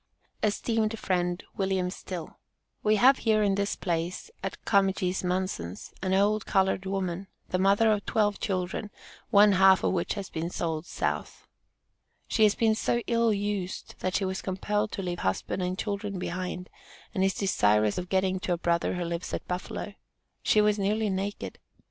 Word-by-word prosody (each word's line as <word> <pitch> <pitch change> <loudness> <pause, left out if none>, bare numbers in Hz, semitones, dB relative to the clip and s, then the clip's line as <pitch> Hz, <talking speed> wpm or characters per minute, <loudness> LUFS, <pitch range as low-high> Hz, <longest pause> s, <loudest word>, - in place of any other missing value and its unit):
ESTEEMED 220 +1 0
FRIEND 180 -2 -1
WILLIAM 190 -2 0
STILL: 180 -3 -7 0.4
We 215 0 +3
have 255 +5 +6
here 215 -2 +3
in 200 -1 +3
this 200 +1 0
place, 175 - -3
at - - -3
Comegys 190 -2 +2
Munson's 180 - -3
an 185 0 -1
old 205 +2 +2
colored 190 -1 +2
woman, 190 -1 -2 0.2
the 185 - 0
mother 200 +4 +4
of 210 -1 +1
twelve 210 -3 +1
children, 190 +1 -2 0.4
one 205 +1 +7
half 190 0 +6
of - - +2
which 175 +2 -1
has 200 -2 -6
been 165 +1 -3
sold 165 -1 -3
South. - - -3 0.8
She 225 - 0
has 210 -1 +6
been 225 -1 +3
so 235 +2 0
ill 230 -1 +2
used, 200 -3 -3
that 185 - -1
she 195 - +1
was 190 0 -2
compelled 205 +3 -1
to 195 - -3
leave 175 -1 -3
husband 95 - -1
and 180 +1 -1
children 200 -1 -3
behind, 180 0 -4 0.4
and 190 - +1
is 195 0 +2
desirous 105 - +2
of 180 0 -6
getting 190 0 +1
to 185 - -1
a - - -1
brother 170 +1 0
who 180 - -2
lives 170 +1 -3
at - - -7
Buffalo. 180 +3 -4 0.5
She 215 - +4
was 210 0 +2
nearly 210 +1 +1
naked. 195 +2 -4
190 Hz, 170 wpm, -28 LUFS, 180-205 Hz, 0.8 s, one